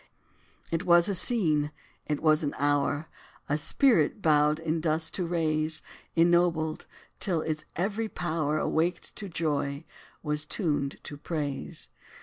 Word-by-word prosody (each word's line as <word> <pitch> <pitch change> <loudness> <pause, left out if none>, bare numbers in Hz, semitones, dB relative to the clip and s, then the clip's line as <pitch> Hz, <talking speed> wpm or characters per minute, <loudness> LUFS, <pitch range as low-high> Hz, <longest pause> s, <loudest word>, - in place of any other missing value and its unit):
It 165 +2 0
was 175 -2 +5
a 200 - +1
scene 165 -8 +2 0.4
it 150 -1 -1
was 155 -1 +4
an 145 -2 -2
hour 145 +1 +1 0.4
A 145 - +1
spirit 230 - +3
bowed 150 -3 +3
in 160 0 -2
dust 160 0 0
to 180 -3 -2
raise 155 -2 0 0.3
Ennobled, 165 -2 +2 0.3
till 175 -6 0
its 155 -1 -3
every 210 +5 -1
power, 155 -5 -1
Awaked 165 +3 -1
to 200 - -5
joy, 150 -2 -2 0.4
was 150 -1 -1
tuned 150 -4 -1
to 145 - -8
praise. 145 -2 -4
160 Hz, 135 wpm, -28 LUFS, 150-175 Hz, 0.4 s, was